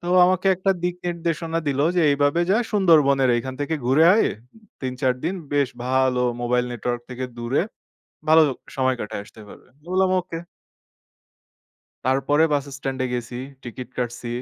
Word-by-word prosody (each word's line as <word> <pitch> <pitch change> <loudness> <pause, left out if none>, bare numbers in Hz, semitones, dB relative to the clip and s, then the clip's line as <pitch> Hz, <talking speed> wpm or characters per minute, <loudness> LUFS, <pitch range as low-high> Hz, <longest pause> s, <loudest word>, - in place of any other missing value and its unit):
তো - - -16
ও - - +5
আমাকে 185 +1 +1
একটা 195 +1 +1
দিক 180 0 0
নির্দেশনা 165 -1 -2
দিলো 140 +1 +1
যে, - - +4
এইভাবে 145 +4 +2
যা, 205 - +4 0.2
"সুন্দরবনের 150 -10 +4
এখান 130 +2 -5
থেকে 145 +3 -1
ঘুরে 140 +6 +5
আয়। - - +3 0.5
৩ 130 -1 -3
৪ 130 -3 +2
দিন 180 +4 0 0.2
বেশ 140 -3 +2 0.2
ভালো 130 -1 +2 0.2
মোবাইল 125 +1 +1
নেটওয়র্ক 120 0 -3
থেকে 125 +1 -4
দূরে, 120 +7 0 0.7
ভালো 160 0 +8 0.3
সময় 130 -1 +1
কাটায় 100 -1 -4
আসতে 110 - -15
পারবে।" - - -14
আমি 145 +2 -31
বললাম 185 0 +3
"ওকে"। 170 -2 -7 1.7
তারপরে 135 +4 +2
বাস 145 -2 +1
স্ট্যান্ড 135 -1 -4
এ - - 0
গেছি, 120 0 -4 0.3
টিকিট 125 +1 -7
কাটছি। 120 0 -3
135 Hz, 160 wpm, -23 LUFS, 125-165 Hz, 1.7 s, ভালো